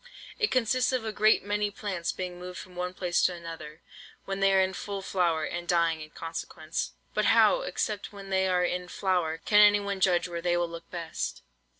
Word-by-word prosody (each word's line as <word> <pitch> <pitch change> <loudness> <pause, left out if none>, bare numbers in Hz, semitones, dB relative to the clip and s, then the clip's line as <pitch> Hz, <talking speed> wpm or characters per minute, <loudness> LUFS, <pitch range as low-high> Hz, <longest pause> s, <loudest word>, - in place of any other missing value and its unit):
It 430 - +2
consists 255 +1 +2
of 255 -3 -1
a 220 - -2
great 215 +1 +4
many 205 +1 0
plants 200 -4 -3
being 180 -1 -6
moved 180 0 -7
from 185 -1 -10
one 180 +1 -3
place 175 -2 +1
to 180 - -5
another, 165 -2 -9 0.4
when 195 0 -3
they 195 0 +4
are 195 - +5
in 190 0 +2
full 200 0 -5
flower, 170 -5 +1
and 175 0 -5
dying 170 -2 +2
in 155 - -9
consequence. 165 0 -5 0.2
(But - - +1
how, - - +5
except 215 - -3
when 200 -1 -10
they 190 0 +2
are 180 -1 +2
in 180 0 -2
flower, 175 -4 0
can 210 - +5
anyone 205 -1 +5
judge 180 -1 +3
where 170 -1 -5
they 175 0 +1
will 175 -1 0
look 170 0 -9
best?) 170 -2 -4
180 Hz, 205 wpm, -28 LUFS, 170-200 Hz, 0.4 s, are